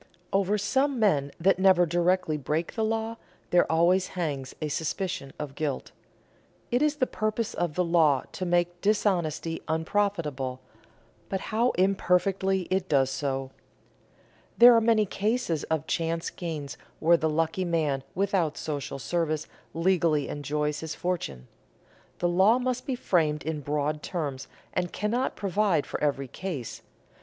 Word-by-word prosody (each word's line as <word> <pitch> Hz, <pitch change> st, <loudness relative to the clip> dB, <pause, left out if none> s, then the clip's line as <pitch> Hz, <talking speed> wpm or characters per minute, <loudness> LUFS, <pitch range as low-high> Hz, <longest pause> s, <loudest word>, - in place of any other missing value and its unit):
Over 195 Hz, +1 st, +2 dB
some 265 Hz, +7 st, +1 dB
men 150 Hz, -11 st, +2 dB
that 185 Hz, +2 st, +3 dB
never 185 Hz, -2 st, +5 dB
directly 175 Hz, 0 st, +1 dB
break 150 Hz, +3 st, -2 dB
the 225 Hz, -, -1 dB
law 225 Hz, +1 st, -1 dB, 0.3 s
there 175 Hz, -2 st, +4 dB
always 175 Hz, +3 st, +3 dB
hangs 145 Hz, -6 st, -3 dB
a 155 Hz, -, -2 dB
suspicion 160 Hz, 0 st, -3 dB
of 150 Hz, -2 st, -5 dB
guilt. 145 Hz, -2 st, -3 dB, 0.8 s
It 245 Hz, +2 st, +2 dB
is 300 Hz, 0 st, +2 dB
the 280 Hz, -3 st, +1 dB
purpose 215 Hz, -1 st, -2 dB
of 170 Hz, -4 st, -2 dB
the 180 Hz, -, +2 dB
law 160 Hz, -5 st, +3 dB
to -, -, -5 dB
make 175 Hz, 0 st, 0 dB
dishonesty 175 Hz, -6 st, 0 dB
unprofitable, 160 Hz, -6 st, -1 dB, 0.7 s
but 190 Hz, -, -1 dB
how 235 Hz, +3 st, +3 dB
imperfectly 190 Hz, 0 st, +2 dB
it 185 Hz, 0 st, 0 dB
does 135 Hz, -2 st, +3 dB
so! 135 Hz, -2 st, -2 dB, 1.1 s
There 240 Hz, 0 st, +9 dB
are 230 Hz, -, +5 dB
many 220 Hz, -1 st, +3 dB
cases 205 Hz, -, -1 dB
of 160 Hz, -1 st, -1 dB
chance 165 Hz, 0 st, -1 dB
gains 155 Hz, -5 st, -5 dB, 0.2 s
where 170 Hz, +2 st, +5 dB
the 160 Hz, -1 st, 0 dB
lucky 165 Hz, +4 st, 0 dB
man 155 Hz, -6 st, 0 dB
without 185 Hz, -4 st, 0 dB
social 145 Hz, -3 st, -4 dB
service 155 Hz, +4 st, -1 dB, 0.3 s
legally 165 Hz, -4 st, +2 dB
enjoys 150 Hz, +1 st, -2 dB
his 160 Hz, 0 st, -5 dB
fortune. 70 Hz, -, -3 dB, 0.7 s
The 175 Hz, -, +1 dB
law 190 Hz, +7 st, +4 dB
must 255 Hz, 0 st, -2 dB
be 265 Hz, -, 0 dB
framed 160 Hz, -, +1 dB
in 155 Hz, -1 st, -3 dB
broad 150 Hz, +1 st, -1 dB
terms, 145 Hz, -7 st, -4 dB, 0.3 s
and 180 Hz, -1 st, -1 dB
cannot 235 Hz, +5 st, -1 dB
provide 195 Hz, -5 st, +1 dB
for -, -, -5 dB
every 140 Hz, -2 st, 0 dB
case. 145 Hz, -5 st, -6 dB
170 Hz, 145 wpm, -27 LUFS, 150-195 Hz, 1.1 s, There